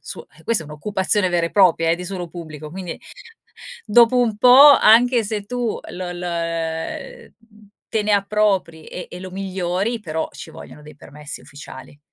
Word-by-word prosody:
suo - - -10 0.2
questa 230 -8 0
è - - -13
un'occupazione 190 +5 -1
vera 170 -1 0
e - - -8
propria, 165 -4 +3
eh, 170 - +1
di 180 - -8
suolo 180 -2 -6
pubblico, 155 -3 -9
quindi 180 -1 -7 0.9
dopo 240 +1 +4
un 225 -4 +1
po' 255 +5 +8
anche 235 +1 +5
se 210 0 -3
tu 240 +1 -3
l - - -9 0.2
l - - -8
ehm, 165 -2 -5 0.6
te 220 - -1
ne 210 - +1
appropri 200 -5 0
e 180 - -8
e 180 - -8
lo 185 0 -9
migliori 190 +3 -3
però 160 -5 -4
ci - - -10
vogliono 150 - -13
dei 150 0 -13
permessi 145 +1 -10
ufficiali. 140 0 -12
185 Hz, 170 wpm, -20 LUFS, 165-210 Hz, 0.9 s, po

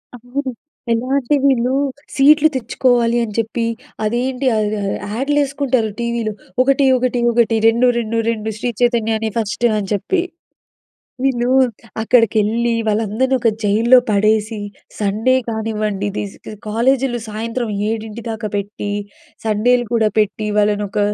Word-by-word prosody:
అవును. 255 +3 -4 0.4
ఎలా 230 +3 0
అంటే 280 +2 +1
వీళ్ళు, 260 -2 +2 0.4
సీట్‌లు 300 +3 +6
తెచ్చుకోవాలి 240 -1 +1
అని 215 -2 -5
చెప్పి 230 +1 -1 0.4
అదేంటి 250 +4 -1
ఆహ్, 210 0 0
ఆహ్, 195 0 -1 0.2
యాడ్‌లేసుకుంటారు 275 -3 0
టీవీలో 235 -2 -2 0.3
ఒకటి, 275 +1 +3
ఒకటి, 250 -1 0
ఒకటి. 230 -1 +3
రెండు, 235 +2 +3
రెండు, 230 0 -2
రెండు 220 -1 -3
శ్రీ 240 0 -1
చైతన్యనే 225 -2 +1
ఫస్టు 225 +2 0
అని 195 -2 -5
చెప్పి. 345 - 0 1.0
వీళ్ళు 245 -2 +1 0.5
అక్కడికెళ్లి, 230 0 +2 0.2
వాళ్ళందరిని 220 +5 +1
ఒక 235 -2 +2
జైల్‌లో 225 +5 +5
పడేసి, 215 +1 +1 0.4
సండే 215 +5 +1
కానివ్వండి, 215 -3 -2
ఇది 205 - -3
స్ - - -16
క - - -7
కాలేజీలు 245 +3 +1
సాయంత్రం 225 +2 -3 0.2
7 220 0 -4
దాకా 220 -1 -3
పెట్టి, 205 0 -4 0.6
సండేలు 240 +3 +2
కూడా 225 -2 +2
పెట్టి, 210 +1 0
వాళ్ళని 205 0 +2
ఒక 210 +1 -2
230 Hz, 130 wpm, -18 LUFS, 215-250 Hz, 1.0 s, సీట్‌లు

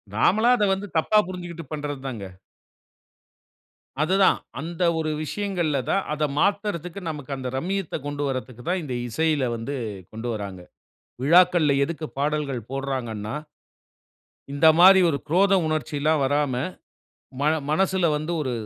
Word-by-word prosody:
நாமளா 220 - +3
அதை 210 - +2
வந்து 200 +2 -4
தப்பா 215 +7 +3
புரிஞ்சுகிட்டு 175 -2 -7
பண்றதுதாங்க. 135 -7 -5 1.8
அதுதான். 190 +4 +3 0.2
அந்த 170 +2 -3 0.2
ஒரு 155 -1 -1
விஷயங்கள்ல 175 -5 -1
தான், 195 - +2
அத 150 0 -2 0.2
மாத்தறதுக்கு, 200 -2 -1
நமக்கு 145 -2 -7
அந்த 130 - -5
ரம்யத்த 190 +4 -2
கொண்டு 145 0 -3
வரத்துக்குத் 130 0 -5
தான், 180 0 0
இந்த 135 -4 -5 0.2
இசையில 150 -1 +1
வந்து 115 +5 -4 0.4
கொண்டு 110 +2 -5
வராங்க. 100 -4 -6 0.6
விழாக்கள்ல 170 0 +5
எதுக்கு 160 +2 -4
பாடல்கள் 145 -3 -1
போடுறாங்கன்னா 125 -6 -3 1.2
இந்த 145 +3 +4
மாரி, 190 +2 +9
ஒரு 145 -4 +1
குரோத 195 +5 +3
உணர்ச்சிலாம் 155 0 0
வராம, 145 0 +1 0.9
மன 150 - +3 0.2
மனசுல 190 +1 +2
வந்து 155 +3 -2
ஒரு 130 -3 -2
155 Hz, 120 wpm, -24 LUFS, 135-180 Hz, 1.8 s, மாரி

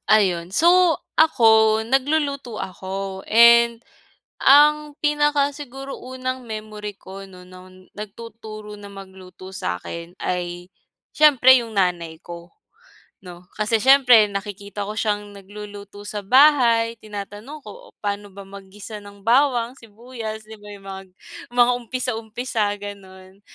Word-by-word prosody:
Ayun. 185 -5 +2
So, 345 - +4 0.2
ako 220 -7 +4
nagluluto 280 -2 -1
ako. 190 +1 -6
And 235 +1 +5 0.6
ang 300 +1 +5
pinaka 295 -1 +2
siguro 270 -1 -8
unang 255 0 -6
memory 215 -2 -7
ko 195 +1 -11
'no 185 -1 -15
no'n 185 0 -16
nagtuturo 215 0 -9
na 205 - -12
magluto 190 -1 -12
sa'kin 170 - -6
ay 175 0 -4 0.4
siyempre 260 -4 +6
yung 230 -1 -9
nanay 175 -4 -1
ko, 170 0 -11 0.7
'no? 180 0 -12
Kasi, 215 +1 0
siyempre 250 -4 +6
nakikita 200 0 -6
ko 205 - -5
siyang 210 -1 -2
nagluluto 205 0 -11
sa 205 0 -5
bahay, 235 -1 +4
tinatanong 210 +7 -9
ko, - - -12
"Oh, - - -48
paano 205 0 -3
ba 200 0 -12
mag-gisa 200 +2 -11
ng 200 -1 -15
bawang, 245 0 +2
sibuyas?" 225 -1 -8
'Di 220 0 -13
ba. 210 - -13
Yung 195 - -18
mga 195 0 -7 0.5
mga 245 0 +3
umpisa 250 +1 -4
umpisa, 225 -1 -2
gano'n. 190 -1 -12
215 Hz, 125 wpm, -22 LUFS, 195-250 Hz, 0.7 s, siyempre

